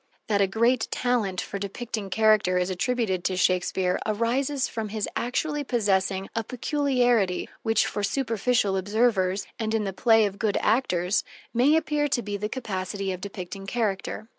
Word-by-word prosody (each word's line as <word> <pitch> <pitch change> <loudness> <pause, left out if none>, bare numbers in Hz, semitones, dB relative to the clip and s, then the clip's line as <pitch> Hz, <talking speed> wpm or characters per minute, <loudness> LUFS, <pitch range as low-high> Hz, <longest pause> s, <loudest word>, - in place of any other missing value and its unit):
That 205 -2 +1
a 195 - +4
great 230 +4 +2
talent 230 -7 0
for 200 - -5
depicting 205 +1 -5
character 215 -3 +3
is 180 +1 0
attributed 190 -2 -1
to 185 - 0
Shakespeare 180 0 +1
arises 255 +6 0
from 220 -2 -4
his 215 0 -2
actually 295 +5 -1
possessing 195 -6 0
a 225 - 0
peculiarity 245 -6 +1
which, 225 -1 +2
for 205 - -3
superficial 225 -2 +1
observers 200 -1 +1
and 220 0 -1
in 220 - +1
the 195 -1 -3
play 225 +2 +4
of 200 -1 -4
good 215 -3 +1
actors, 200 -5 +1 0.3
may 255 +6 +4
appear 300 -2 +1
to 240 -4 -1
be 205 0 -4
the 210 +1 -3
capacity 195 -5 -3
of 185 -1 -5
depicting 195 0 -7
character. 215 -1 -2
215 Hz, 160 wpm, -26 LUFS, 195-245 Hz, 0.3 s, a